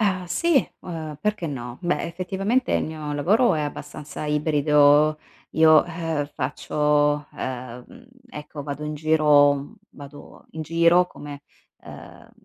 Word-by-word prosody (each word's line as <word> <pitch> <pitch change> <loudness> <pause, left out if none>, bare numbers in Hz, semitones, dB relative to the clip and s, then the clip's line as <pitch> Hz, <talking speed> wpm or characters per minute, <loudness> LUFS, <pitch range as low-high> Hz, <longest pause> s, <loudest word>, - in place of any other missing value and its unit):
Ah 185 -4 0
sì, 335 - +2 0.2
uhm, 155 -4 -7
perché 210 -5 -2
no, 120 -3 -7
beh 175 0 -1
effettivamente 195 +8 -2
il - - +1
mio 155 -2 -6
lavoro 190 - +2
è 150 - -1
abbastanza 150 +1 -7
ibrido. 150 0 +3 0.3
Io, 155 -1 +6
ehm, 165 -3 -3
faccio, 145 +2 0
ehm, 125 - -7 0.2
ecco 150 -3 -8
vado 145 +1 -6
in 150 - -4
giro 145 -2 +3 0.2
vado 145 0 -13
in 160 0 -6
giro 170 +3 +3
come, 145 -3 -10 0.4
ehm, - - -13
150 Hz, 125 wpm, -23 LUFS, 145-170 Hz, 0.4 s, Io